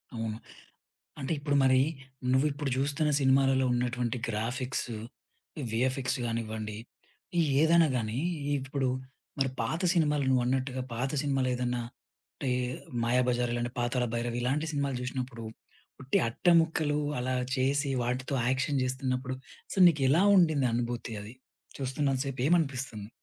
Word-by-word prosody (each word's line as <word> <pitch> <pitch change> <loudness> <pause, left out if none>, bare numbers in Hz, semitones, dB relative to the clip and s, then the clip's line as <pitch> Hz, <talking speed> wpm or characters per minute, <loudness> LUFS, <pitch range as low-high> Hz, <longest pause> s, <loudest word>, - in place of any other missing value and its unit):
అవును. 110 -1 -3 0.8
అంటే 135 +1 -3
ఇప్పుడు 145 0 0
మరి, 130 0 +5 0.5
నువ్విప్పుడు 140 +2 +1
జూస్తున్న 145 +3 +1
సినిమాలలో 135 -1 +4
ఉన్నటువంటి 120 0 -1
గ్రాఫిక్సు, 120 +1 -2 0.7
వీఎఫ్ఎక్స్ 130 +3 0
గానివ్వండి. 110 -2 -3 0.6
ఈ - - +5 0.2
ఏదన్నా 165 +1 +5
గానీ, 110 +1 -2 0.4
ఇప్పుడు 135 0 -2 0.5
మరి 135 -1 +2
పాత 155 +9 -1
సినిమాలు 150 -5 +2
నువ్వన్నట్టుగా, 130 +1 +1
పాత 125 +4 -1
సినిమాలేదన్నాంటే, 125 -3 -2 0.9
'మాయాబజార్' 125 0 +2
ఇలా 120 - -1 0.2
'పాతాళ 125 +1 0
భైరవి' 120 +1 -2
ఇలాంటి 140 +6 0
సినిమాలు 140 -2 -1
జూసినప్పుడు, 125 -2 -4 0.6
ఉట్టి 135 - +2
అట్టముక్కలు 160 +1 +3 0.2
అలా 130 +1 -1 0.2
చేసి, 140 +2 +1
వాటితో 125 +3 -2
యాక్షన్ 135 +1 +1
జేస్తున్నప్పుడు. 130 0 -2 0.4
సో, - - -11
నీకెలా 145 +1 +3
ఉండింది 155 -8 +4
అనుభూతి 120 -1 -2
అది? 105 +4 -10 0.4
చూస్తున్నంత 135 0 0
సేపు 135 -2 -3
ఏమనిపిస్తుంది? 130 -10 0
130 Hz, 110 wpm, -29 LUFS, 120-140 Hz, 0.9 s, మరి